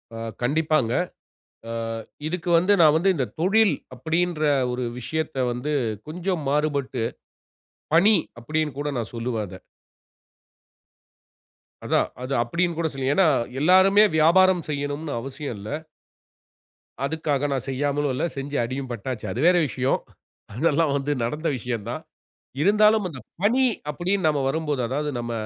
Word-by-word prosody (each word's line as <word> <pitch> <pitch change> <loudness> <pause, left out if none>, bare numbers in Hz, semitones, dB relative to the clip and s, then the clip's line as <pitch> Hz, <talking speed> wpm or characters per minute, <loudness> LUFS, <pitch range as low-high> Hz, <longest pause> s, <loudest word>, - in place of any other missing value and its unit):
ஆ - - -6 0.2
கண்டிப்பாங்க. 150 -1 +1 0.8
ஆ - - -4 0.6
இதுக்கு 175 +1 -3
வந்து 185 +5 +4
நான் 155 -2 +6
வந்து 185 +4 +2
இந்த 135 -5 0 0.2
தொழில் 210 +4 +4 0.2
அப்படின்ற 165 +3 -1 0.3
ஒரு 125 +1 -2 0.2
விஷயத்தை 155 +2 -3
வந்து 125 +5 -3 0.4
கொஞ்சம் 175 0 -2
மாறுபட்டு, 140 -4 0 0.9
பணி 200 +6 +6 0.2
அப்படினு 150 +2 -2
கூட 145 - -2
நான் 115 -2 -4
சொல்வேன் 115 -2 -2
அதை. 95 +1 -10 2.3
அதான் - - +2 0.2
அது 130 +2 -3
அப்படினு 170 +7 -1
கூட 165 -1 +1
சொல்லி 135 -1 -2
ஏனா, 190 +2 +4 0.3
எல்லோருமே 190 +6 +6
வியாபாரம் 180 +3 +5
செய்யனும்னு 145 +1 -3
அவசியம் 135 0 -6
இல்ல. 105 +2 -8 1.4
அதுக்காக 145 -2 -1
நான் 130 -2 -2
செய்யாமலும் 145 +1 0
இல்ல, 130 - 0
செஞ்சு 140 +1 -4
அடியும் 130 +2 -4
பட்டாச்சு. 120 0 -5
அது 110 - -4
வேற 180 0 +5
விஷயம். 130 0 0 0.6
அதெல்லாம் 155 +2 +2
வந்து 140 +1 -2
நடந்த 150 +8 -2
விஷயந்தான். 120 +4 -4 0.6
இருந்தாலும் 210 +3 +4
அந்த 150 -7 -9 0.2
பணி 245 +6 +4 0.3
அப்படினு 180 +3 0
நம்ம 150 -2 +1
வரும்போது, 150 -1 -1
அதாவது 150 +4 -1
நம்ம 120 0 -4
150 Hz, 125 wpm, -24 LUFS, 130-170 Hz, 2.3 s, நான்